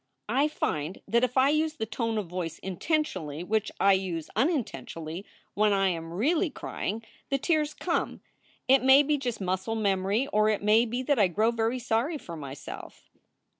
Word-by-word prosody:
"I 270 +6 +3
find 160 - -2
that 235 +2 +2
if 250 +1 0
I 260 +1 +5
use 310 +1 +1
the 220 - -3
tone 225 0 -2
of 210 - -1
voice 175 -1 -4
intentionally 185 - -2
which 215 +3 0
I 195 0 +6
use 180 -4 -2
unintentionally 175 - -2 0.3
when 210 0 +3
I 195 -1 +3
am 165 -2 -4
really 310 - +1
crying, 225 -5 -4 0.3
the 275 - +2
tears 305 +1 0
come. - - -2 0.5
It 270 +1 +6
may 265 +2 +7
be 295 0 +1
just 245 -4 -3
muscle 190 +3 -2
memory 200 +2 +1
or 215 +1 +4
it 210 -2 0
may 215 +3 +5
be 245 +2 -3
that 280 -1 +2
I 200 - +6
grow 215 +6 +2
very 230 +2 0
sorry 250 +6 0
for 170 - -8
myself. 140 -3 -9
220 Hz, 175 wpm, -28 LUFS, 185-265 Hz, 0.5 s, may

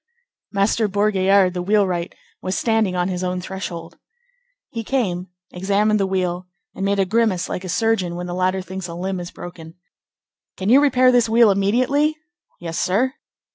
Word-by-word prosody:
Master 210 +2 +1
Bourgaillard, 195 -2 +3
the 180 - -3
wheelwright, 185 -3 0 0.3
was 185 +1 -2
standing 220 -5 +1
on 180 0 0
his 185 -1 -3
own 180 0 -1
threshold. 180 -3 -7 0.7
He 230 -4 -4
came, 190 -8 -1 0.2
examined 205 +3 +1
the 195 - +1
wheel 180 -1 -2 0.3
and 195 - -5
made 200 +1 +1
a 195 - +2
grimace 210 -3 +1
like 180 - -4
a 185 - -6
surgeon 205 -4 0
when 175 0 -5
the 175 - -5
latter 185 +1 0
thinks 185 +1 -6
a 170 - -7
limb 185 +1 -3
is 175 -1 -6
broken. 165 -2 -10 0.8
"Can 190 +2 -2
you 265 +4 +7
repair 255 -3 +4
this 240 -2 +3
wheel 225 -1 +6
immediately?" 255 +10 +1 0.4
"Yes, 165 -1 -4
sir." 225 +8 +1
190 Hz, 170 wpm, -21 LUFS, 180-220 Hz, 0.8 s, you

